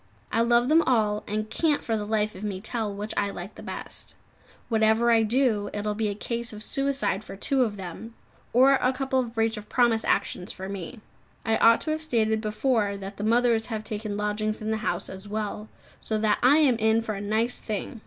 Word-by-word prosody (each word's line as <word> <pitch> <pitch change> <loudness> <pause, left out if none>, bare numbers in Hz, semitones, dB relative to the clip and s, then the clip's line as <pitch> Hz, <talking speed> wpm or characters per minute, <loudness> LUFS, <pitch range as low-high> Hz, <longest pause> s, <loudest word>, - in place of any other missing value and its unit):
I 230 - +2
love 240 +1 +3
them 315 +3 +5
all, 215 -7 +1
and 215 +1 -2
can't 305 +4 0
for 225 - -1
the 210 -1 -3
life 215 -1 0
of 185 - -10
me 200 -3 -3
tell 220 +1 -3
which 205 +2 -5
I 200 - +1
like 195 +1 -7
the - - -11
best. - - -5 0.5
Whatever 220 +1 +3
I 225 -1 +5
do, 220 -3 +1
it 205 0 -3
will 210 - 0
be 215 0 -1
a 200 - -3
case 235 +2 -3
of 215 0 -7
suicide 275 -6 0
for 195 - -9
two 265 +7 +1
of 210 -4 -3
them, 195 +5 -8 0.4
or 260 +3 +6
a 255 - +2
couple 265 0 0
of 240 -2 -3
breach 225 0 +1
of 210 - -9
promise 235 -3 +3
actions 180 - -1
for 190 0 -7
me. 200 +4 -7 0.4
I 225 0 +2
ought 230 0 +5
to 310 - -2
have 310 0 -2
stated 220 -7 +1
before 215 -2 0
that 195 0 -8
the 205 - -4
mothers 230 0 +2
have 220 -2 -4
taken 215 -1 -4
lodgings 210 +1 -1
in 215 0 -3
the 220 - 0
house 180 -3 -2
as 190 +2 -9
well, 210 0 -4 0.3
so 220 - -1
that 215 -1 +2
I 265 +4 +6
am 275 -7 +4
in 220 0 +2
for 220 - -3
a 200 - -5
nice 220 +4 0
thing! 215 +2 -5
220 Hz, 225 wpm, -26 LUFS, 210-235 Hz, 0.5 s, or